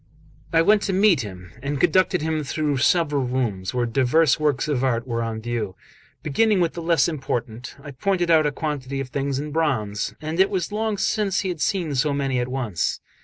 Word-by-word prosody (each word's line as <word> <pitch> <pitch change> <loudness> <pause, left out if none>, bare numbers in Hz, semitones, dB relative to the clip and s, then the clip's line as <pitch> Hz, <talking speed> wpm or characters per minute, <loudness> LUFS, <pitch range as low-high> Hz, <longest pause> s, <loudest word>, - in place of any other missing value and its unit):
I 165 0 +4
went 210 +4 +4
to - - +1
meet 195 -2 +4
him, 90 -5 -9
and 140 +1 -3
conducted 180 0 +3
him 160 -1 -1
through 145 0 -1
several 150 0 +2
rooms 120 -7 -2
where 125 -1 0
divers 135 +5 +3
works 150 -3 +1
of 140 -4 0
art 120 -1 0
were 115 -1 -2
on 115 -1 -3
view. 115 -5 -3 0.5
Beginning 205 +7 +2
with 170 -2 +1
the 170 - -6
less 165 -5 +3
important, 125 -6 -4
I 145 - -8
pointed 175 +4 0
out 155 -2 +5
a - - 0
quantity 140 -3 -4
of 135 -1 -4
things 140 0 -2
in 150 +2 -4
bronze; 130 -11 -1
and 155 +3 -4
it 190 - +5
was 185 -1 -2
long 215 0 -1
since 195 -1 0
he 190 - -2
had 170 -4 -4
seen 175 -7 0
so 145 +2 +1
many 135 -2 0
at 125 - -1
once. 125 -8 -2
145 Hz, 205 wpm, -23 LUFS, 125-170 Hz, 0.5 s, out